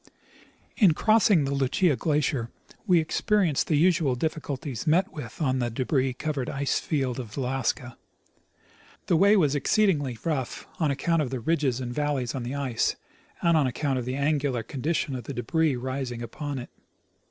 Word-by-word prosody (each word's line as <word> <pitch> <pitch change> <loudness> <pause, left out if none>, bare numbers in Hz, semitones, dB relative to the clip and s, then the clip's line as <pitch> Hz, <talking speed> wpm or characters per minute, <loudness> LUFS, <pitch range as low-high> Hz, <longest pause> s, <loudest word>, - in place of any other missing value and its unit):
In 185 -9 +5
crossing 215 -7 +4
the 135 - -1
Lucia 140 +4 +2
glacier 140 -3 0 0.4
we 180 -3 +5
experienced 170 0 +1
the 155 - +2
usual 160 -5 +3
diffi 155 +4 -2
culties 140 -1 -5
met 170 +5 +2
with 125 -7 -8
on 130 -4 +1
the 120 -1 0
debris 130 +2 0
covered 135 -1 -3
ice 140 0 0
field 135 -5 -1
of 115 -1 -8
Alaska. 125 -1 -2 1.1
The 175 - +2
way 200 +5 +5
was 150 -7 +3
exceedingly 145 - +1
rough, 145 -7 -2
on 160 -3 +2
account 160 +4 +1
of 140 - -2
the 130 0 -3
ridges 135 -2 0
and 120 -2 -4
valleys 145 -4 -1
on 135 - -3
the 120 +3 -4
ice, 135 -5 0 0.5
and 170 -1 +4
on 150 -4 +3
account 135 +1 -1
of 120 - -4
the 125 +1 -3
angular 140 -4 0
condition 140 +4 -2
of 125 -3 -6
the - - -6
debris 150 +5 +1
resting 125 -1 -4
upon 145 +3 -5
it. 125 - -7
140 Hz, 170 wpm, -26 LUFS, 125-155 Hz, 1.1 s, In